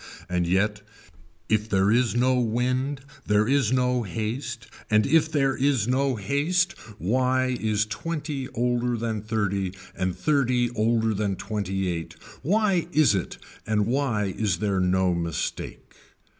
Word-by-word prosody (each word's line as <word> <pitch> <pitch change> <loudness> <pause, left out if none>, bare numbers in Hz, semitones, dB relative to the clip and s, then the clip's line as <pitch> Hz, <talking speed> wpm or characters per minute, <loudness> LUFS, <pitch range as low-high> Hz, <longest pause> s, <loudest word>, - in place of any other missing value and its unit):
And 90 -1 0
yet 105 +4 +1 0.7
if 110 0 +1
there 95 0 +3
is 120 0 +2
no 125 +1 +3
wind 125 +4 0 0.3
there 105 +1 +3
is 135 -4 +2
no 125 -1 +2
haste 115 +4 -4 0.2
and 110 -1 +4
if 160 0 +3
there 135 -3 +2
is 130 -5 +1
no 130 +1 +1
haste 145 - +1 0.3
why 130 +5 +1
is 110 -1 +1
twenty 145 +4 -4
older 120 0 0
than 110 -2 -2
thirty 100 -3 -1 0.2
and 90 -1 -2
thirty 125 -5 +1
older 115 0 +1
than 100 -1 -1
twenty 95 -2 -3
eight, 85 -2 -4 0.3
why 195 0 +2
is 155 -7 +4
it 95 -3 -3 0.3
and 105 -1 +2
why 115 -6 0
is 100 -6 0
there 100 0 0
no 90 0 +2
mistake. 85 -2 -4
115 Hz, 140 wpm, -25 LUFS, 105-130 Hz, 0.7 s, and